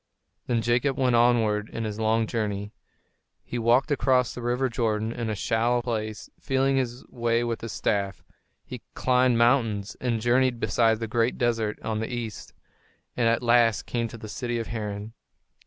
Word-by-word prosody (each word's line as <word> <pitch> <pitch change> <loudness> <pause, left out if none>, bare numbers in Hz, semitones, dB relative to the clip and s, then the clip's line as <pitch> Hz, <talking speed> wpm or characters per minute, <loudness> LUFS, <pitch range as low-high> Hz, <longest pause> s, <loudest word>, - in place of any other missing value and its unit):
Then 115 -2 0
Jacob 125 +3 +1
went 125 -2 +2
onward 115 -3 +3
in 115 - -4
his 105 -1 -4
long 110 +1 +2
journey. 105 -3 -3 0.7
He 120 - -4
walked 120 +6 +3
across 130 -3 +2
the 125 - -7
river 125 +2 0
Jordan 110 -2 -1
in 115 -1 -4
a 110 - -1
shallow 120 +4 +1
place, 110 -4 -4
feeling 135 0 +1
his 125 -1 -2
way 120 0 0
with 115 -1 -3
his 115 - -5
staff; 100 -1 -1 0.4
he - - -8
climbed 125 -1 +3
mountains 115 -4 +2
and 120 -3 0
journeyed 120 +1 +2
beside 115 -2 +2
the 115 - -3
great 115 +2 0
desert 115 -3 0
on 110 -1 -2
the 110 - -4
east, 115 -3 -5 0.6
and 120 -2 +2
at 115 +1 +1
last 115 -2 +3
came 120 -1 -2
to 115 - -10
the 110 -1 -9
city 120 +3 -3
of 115 - -4
Haran. 105 -1 -5
115 Hz, 170 wpm, -26 LUFS, 110-120 Hz, 0.7 s, onward